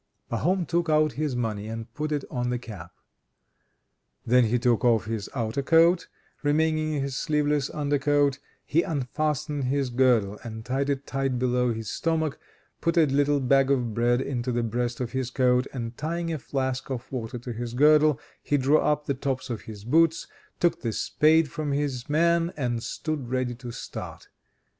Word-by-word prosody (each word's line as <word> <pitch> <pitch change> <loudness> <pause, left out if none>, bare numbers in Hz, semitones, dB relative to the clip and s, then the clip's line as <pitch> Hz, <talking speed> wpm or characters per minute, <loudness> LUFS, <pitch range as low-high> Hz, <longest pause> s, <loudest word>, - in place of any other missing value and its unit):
Pahom 175 +10 +1
took 170 +1 0
out 155 -1 +3
his 150 -3 -2
money 110 -3 -2
and 115 0 -7
put 155 +1 -3
it 145 -2 -1
on 125 -1 -1
the 125 - 0
cap. 100 -8 -9 1.3
Then 125 +1 +5
he 115 +2 +1
took 120 -1 +2
off 115 -3 +3
his 110 -2 -4
outer 115 +2 -1
coat, 165 +4 +4 0.3
remaining 155 +1 +1
in 140 - -1
his 135 -1 -3
sleeveless 150 -1 0
under 145 -1 -1
coat. 145 -1 +2 0.3
He 165 - +2
unfastened 150 -1 -2
his 135 0 0
girdle 120 -5 +2
and 110 -1 -7
tied 135 +3 -1
it 140 0 -1
tight 135 -2 -1
below 125 0 +1
his 110 -1 -5
stomach, 160 -3 -1 0.4
put 170 +1 0
a 165 - +6
little 145 +1 +2
bag 135 +1 +3
of 125 -5 +1
bread 120 +2 +2
into 125 -2 -2
the 120 0 0
breast 120 +1 -2
of 120 - -3
his 130 -2 -2
coat, 125 0 +2
and 120 -2 -5
tying 165 +3 -2
a 155 - -3
flask 130 -1 -3
of 130 -1 -5
water 125 -1 -4
to 120 0 -6
his 120 +1 -5
girdle, 150 +1 +5 0.2
he 145 - +1
drew 140 +3 +4
up 150 0 +1
the 140 - 0
tops 130 -1 -3
of 115 - -4
his 105 -2 -9
boots, 165 +7 +3 0.3
took 170 -1 +1
the 115 -3 -2
spade 155 +2 +3
from 150 -2 -2
his 140 -4 -2
man, 170 +2 +2
and 120 -4 -1
stood 150 -1 -4
ready 130 -1 -1
to 120 0 -9
start. 115 - -8
135 Hz, 180 wpm, -26 LUFS, 120-150 Hz, 1.3 s, a